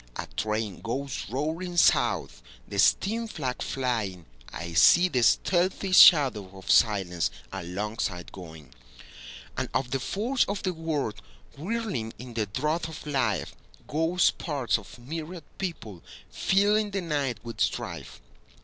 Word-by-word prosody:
A - - -4
train 105 0 -2
goes 130 +3 -4
roaring 160 +8 -3
south, - - +3 0.3
The 100 - -4
steam 225 - +2
flag 135 - -4
flying;I 90 - -4
see 175 - +6
the 130 -7 +1
stealthy 185 +8 +2
shadow 120 - +6
of 95 - -12
silenceAlongside 95 0 -1
going. 80 -7 -11 0.8
And - - -3
off 130 -1 0
the 135 - 0
forge 230 - 0
of 200 0 -3
the 185 - 0
world, 155 -9 -3 0.3
Whirling 170 - -3
in 125 0 -9
the 110 -2 -1
draught 150 +10 -1
of 160 - -9
life, 120 - -1 0.3
Go 160 +4 -1
sparks 145 - +1
of - - -13
myriad 160 +6 -7 0.2
people, 115 - -5 0.3
fillingThe 205 0 +2
night 145 -7 -1
with 115 -1 -7
strife. - - -3
135 Hz, 120 wpm, -27 LUFS, 105-175 Hz, 0.8 s, see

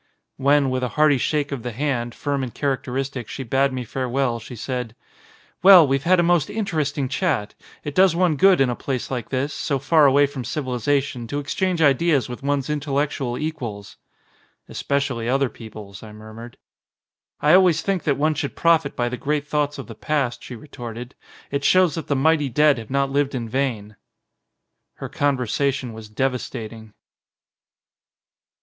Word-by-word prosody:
When, 140 0 +3
with 130 0 -1
a 125 - -1
hearty 150 -3 +4
shake 145 +2 -1
of 135 -4 -4
the 120 - -5
hand, 120 -2 -2
firm 140 -1 -2
and 130 -2 -4
characteristic, 135 -2 -3
she 135 - -5
bade 135 +3 +1
me 130 -1 -4
farewell, 125 0 -2
she 120 +3 -10
said: 125 0 -4 0.7
"Well, 185 -4 +9
we've 135 +1 -1
had 180 +1 +4
a - - +4
most 175 -3 +2
interesting 155 -10 -2
chat. 140 - -1 0.3
It 145 - -5
does 185 -1 +4
one 175 -3 +2
good 190 +5 +5
in 135 - +4
a - - -3
place 130 -1 -4
like 120 -4 -4
this, 140 +2 -2
so 140 - -1
far 145 +2 +4
away 140 +1 +5
from 140 -2 -6
civilisation, 130 -1 -2
to 145 - -4
exchange 170 +4 -1
ideas 145 0 +3
with 125 -1 -8
one's 140 -1 -1
intellec 145 -1 -1
tual 125 -3 -4
equals." 125 -10 -5 0.7
"Especially 140 -5 -2
other 135 0 +1
people's," 105 -4 -11
I 110 - -11
murmured. 110 +2 -11 0.8
"I 150 +2 +4
always 180 -3 +5
think 195 -3 0
that 145 -4 +1
one 155 +2 +2
should 145 -2 -4
profit 165 -4 +2
by 120 - 0
the 125 +1 -4
great 145 +2 -1
thoughts 145 -1 -1
of 135 - -7
the 115 - -9
past," 135 +1 -2
she 125 - -8
retorted. 120 -1 -9 0.4
"It 140 0 -2
shows 185 -2 +4
that 165 - -5
the 145 - 0
mighty 150 +1 +2
dead 150 +1 +3
have 110 - -10
not 140 0 0
lived 140 0 0
in 120 -2 -3
vain." 110 -5 -3 1.0
Her - - -7
conversation 135 -2 -1
was 110 -1 -10
devastating. 110 -2 -4
135 Hz, 170 wpm, -22 LUFS, 120-150 Hz, 1.0 s, Well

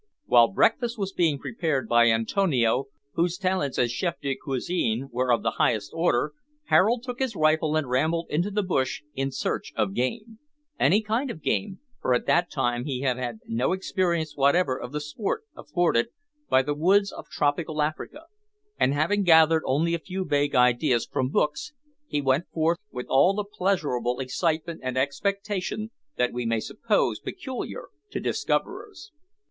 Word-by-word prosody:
While 120 -1 +6
breakfast 235 +4 +1
was 195 -2 -3
being 165 -6 +2
prepared 150 - -2
by 120 0 +5
Antonio, 125 - +1 0.3
whose 175 +1 0
talents 185 -8 -1
as 120 -1 +2
chef 170 +8 -2
de 140 -1 -2
cuisine 135 -2 -2
were 125 +1 0
of 120 - +2
the - - +1
highest 105 -3 +1
order, 155 -3 +1 0.4
Harold 230 +5 +4
took 250 -1 -6
his 260 -5 -1
rifle 155 -1 +2
and 155 -3 0
rambled 160 +7 +1
into 170 +6 0
the 205 0 -1
bush 135 -7 -1
in 135 0 -1
search 130 - -3
of 100 -2 0
game 215 - -3 0.4
any 210 +4 +4
kind 230 +6 -1
of 160 -9 -7
game, 195 -2 -1 0.2
for 125 - +2
at - - -1
that 175 0 +2
time 120 -2 -1
he 130 -3 -3
had 130 -3 0
had 120 -3 -5
no 115 +9 0
experience 175 -4 -1
whatever 140 0 +3
of 125 - -7
the 150 - -2
sport 195 - -3
afforded 170 -10 +1 0.4
by 130 - +4
the 145 +2 -1
woods 195 +7 +3
of - - -10
tropical 150 +1 -1
Africa, 155 - -3 0.6
and, 135 - +3
having 170 +8 +1
gathered 160 -3 +6
only 160 +6 +1
a 170 - 0
few 185 +3 -4
vague 145 -2 +1
ideas 125 0 +3
from 130 -1 -2
books, 150 - -1 0.3
he 145 - -2
went 135 +5 +1
forth 165 +1 0
with 125 0 -5
all 160 +9 +4
the 210 - -1
pleasurable 150 - -1
excitement 160 +5 -1
and 130 0 -3
expectation 200 +8 -2 0.3
that 125 - +1
we 125 0 -2
may 115 -1 0
suppose 215 - 0
peculiar 265 -9 -6 0.2
to - - -4
discoverers. 425 -1 -3
155 Hz, 165 wpm, -26 LUFS, 130-190 Hz, 0.6 s, While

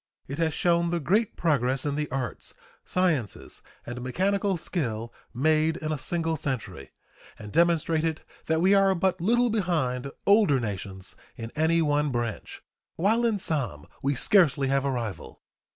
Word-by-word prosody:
It 140 +4 -6
has 165 -1 +2
shown 170 -1 +2
the 170 0 0
great 205 +8 +1
progress 135 -5 +1
in 145 - 0
the 150 0 -2
arts, 130 -3 -4 0.3
sciences, 160 - -1 0.2
and 120 +1 -6
mechanical 190 +8 0
skill 120 - -3 0.2
made 155 +4 +2
in 155 0 -4
a 155 - -1
single 165 +2 -1
century, 115 - -4 0.5
and 105 -1 -9
demonstrated 165 -1 +1 0.2
that 160 0 +1
we 190 +3 +5
are 195 -1 +4
but 185 0 0
little 240 +5 +2
behind 150 - -1 0.2
older 200 -9 +5
nations 95 -4 -5 0.2
in 115 0 -6
any 160 +2 +2
one 150 0 +1
branch, 120 -4 -4 0.3
while 220 +7 +2
in 220 -3 0
some 130 - -1 0.2
we 140 +1 0
scarcely 140 -3 +4
have 135 0 +1
a - - +1
rival. 115 -6 -5
155 Hz, 150 wpm, -26 LUFS, 125-175 Hz, 0.5 s, we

